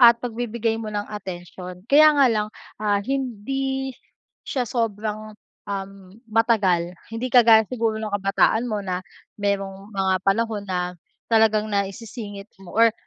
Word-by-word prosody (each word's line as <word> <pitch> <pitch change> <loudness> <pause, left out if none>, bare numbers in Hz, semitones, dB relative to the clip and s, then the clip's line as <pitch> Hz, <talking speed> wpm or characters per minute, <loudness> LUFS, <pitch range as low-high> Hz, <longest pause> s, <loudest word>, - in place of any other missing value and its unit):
at 235 -1 +9
pagbibigay 235 -1 -2
mo 220 - -5
ng 205 0 -2
atensyon, 180 -2 -7
kaya 305 +2 +8
nga 280 -2 +6
lang, 210 -1 0 0.3
ah, 205 -1 +2
hindi 265 +2 -2 0.5
siya 255 -3 -1
sobrang, 215 -2 -2 0.4
um, 195 -1 -4 0.4
matagal 200 -7 +2 0.2
hindi 225 +3 -2
kagaya 225 -3 +7
siguro 225 -3 0
ng 215 -2 -4
kabataan 200 +4 +2
mo 210 -2 -1
na 180 -1 -2 0.4
merong 195 0 -2
mga 190 -1 +2
panahon 215 +1 +1
na 180 -1 -1 0.4
talagang 220 -1 +4
naisisingit 205 +1 -4 0.2
mo 175 - -11
or 230 0 +6
215 Hz, 135 wpm, -23 LUFS, 195-230 Hz, 0.5 s, at